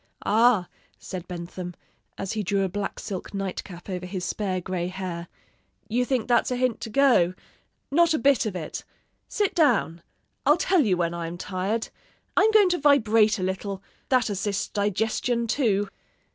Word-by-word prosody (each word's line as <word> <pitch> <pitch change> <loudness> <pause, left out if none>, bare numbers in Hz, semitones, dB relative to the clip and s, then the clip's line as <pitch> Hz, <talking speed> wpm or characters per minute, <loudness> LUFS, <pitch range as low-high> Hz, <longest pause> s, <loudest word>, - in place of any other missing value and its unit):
'Ah!' 220 -4 +4 0.3
said 180 -2 -7
Bentham, 175 0 -6 0.4
as 195 - -4
he 215 - -1
drew 200 0 0
a - - +1
black 200 +2 -4
silk 195 0 -6
night 195 -1 -3
cap 175 -2 -11
over 180 -2 -4
his 185 -1 -4
spare 190 -3 -2
gray 180 -1 -3
hair, 180 -2 -5 0.6
'you 240 +3 +2
think 250 -3 0
that's 240 - +3
a 250 - -1
hint 250 -2 0
to - - -5
go. 220 -9 +4 0.6
Not 335 +2 +4
a - - +2
bit 270 -2 +3
of 200 - -4
it. 160 -4 -5 0.4
Sit 415 -2 0
down! 235 - +2 0.4
I'll 295 +4 +5
tell 360 -2 +3
you 185 -3 +2
when 170 -1 0
I 170 -1 -4
am 170 +1 -6
tired. 195 +5 -2 0.5
I'm 440 - +5
going 425 -3 +5
to 355 -1 +1
vibrate 225 -7 +4
a 185 - -3
little; 190 +1 -3 0.3
that 255 -3 +3
assists 200 -1 -2
digestion, 220 +4 0
too.' 215 -4 +1
205 Hz, 175 wpm, -25 LUFS, 185-245 Hz, 0.6 s, I'll